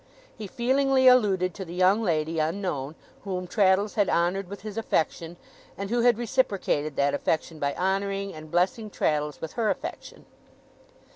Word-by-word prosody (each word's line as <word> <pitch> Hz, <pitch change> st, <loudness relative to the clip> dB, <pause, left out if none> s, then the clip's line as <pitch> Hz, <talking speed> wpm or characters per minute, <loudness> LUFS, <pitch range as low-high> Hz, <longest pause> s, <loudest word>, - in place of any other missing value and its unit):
He 215 Hz, -3 st, -7 dB
feelingly 260 Hz, +4 st, +2 dB
alluded 195 Hz, -8 st, +4 dB
to 190 Hz, -, -6 dB
the 175 Hz, -1 st, -9 dB
young 185 Hz, +4 st, +3 dB
lady, 165 Hz, -4 st, 0 dB
unknown, 155 Hz, -3 st, -2 dB, 0.3 s
whom 185 Hz, -2 st, -4 dB
Traddles 195 Hz, +1 st, +2 dB
had 205 Hz, -3 st, +1 dB
honoured 180 Hz, +3 st, +1 dB
with 200 Hz, 0 st, -8 dB
his 210 Hz, 0 st, -7 dB
affection, 170 Hz, -5 st, -2 dB, 0.4 s
and 200 Hz, +1 st, -5 dB
who 240 Hz, 0 st, +2 dB
had 240 Hz, -2 st, +4 dB
reciprocated 200 Hz, -, 0 dB
that 140 Hz, 0 st, +1 dB
affection 160 Hz, +2 st, -2 dB
by 140 Hz, -1 st, -1 dB
honouring 195 Hz, +1 st, -1 dB
and 155 Hz, 0 st, -10 dB
blessing 185 Hz, +6 st, 0 dB
Traddles 150 Hz, -5 st, -1 dB
with 160 Hz, -, -6 dB
her 230 Hz, -2 st, 0 dB
affection. -, -, -6 dB
190 Hz, 155 wpm, -26 LUFS, 165-215 Hz, 0.4 s, alluded